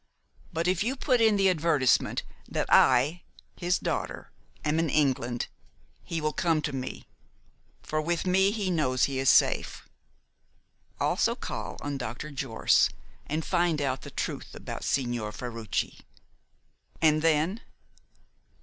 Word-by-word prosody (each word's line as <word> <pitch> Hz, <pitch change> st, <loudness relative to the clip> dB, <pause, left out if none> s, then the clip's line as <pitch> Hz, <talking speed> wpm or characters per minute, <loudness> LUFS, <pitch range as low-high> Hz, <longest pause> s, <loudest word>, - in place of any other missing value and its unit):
But 165 Hz, +2 st, -1 dB
if 185 Hz, +2 st, +2 dB
you 250 Hz, +5 st, -1 dB
put 255 Hz, -3 st, +1 dB
in 220 Hz, -2 st, +5 dB
the 195 Hz, -1 st, +3 dB
advertisement 155 Hz, -7 st, +2 dB, 0.3 s
that -, -, -1 dB
I 135 Hz, +7 st, +5 dB, 0.3 s
his 180 Hz, +1 st, +1 dB
daughter -, -, -4 dB, 0.3 s
am 150 Hz, +2 st, +1 dB
in 165 Hz, -1 st, +1 dB
England, 125 Hz, -5 st, +1 dB, 0.6 s
he 165 Hz, -, -3 dB
will 155 Hz, -1 st, -1 dB
come 165 Hz, -3 st, +1 dB
to 145 Hz, -, -2 dB
me, 130 Hz, -1 st, -5 dB, 0.8 s
for 155 Hz, 0 st, -1 dB
with 170 Hz, +3 st, -1 dB
me 190 Hz, +1 st, +4 dB
he 205 Hz, -3 st, -1 dB
knows 130 Hz, -7 st, +1 dB
he 135 Hz, -1 st, +1 dB
is 135 Hz, -, +3 dB
safe. -, -, +2 dB, 1.1 s
Also -, -, +1 dB
call -, -, -5 dB
on 145 Hz, -1 st, -3 dB
Dr. 125 Hz, +5 st, -5 dB
Jorce, 130 Hz, -4 st, +2 dB, 0.4 s
and 155 Hz, +2 st, -2 dB
find 170 Hz, -3 st, +1 dB
out 135 Hz, -2 st, -1 dB
the -, -, -9 dB
truth -, -, -5 dB
about -, -, -7 dB
Signor 120 Hz, -5 st, -1 dB
Ferruci." 115 Hz, -1 st, -4 dB, 1.0 s
"And 155 Hz, -1 st, +4 dB
then?" 165 Hz, +7 st, +2 dB
155 Hz, 135 wpm, -28 LUFS, 130-175 Hz, 1.1 s, in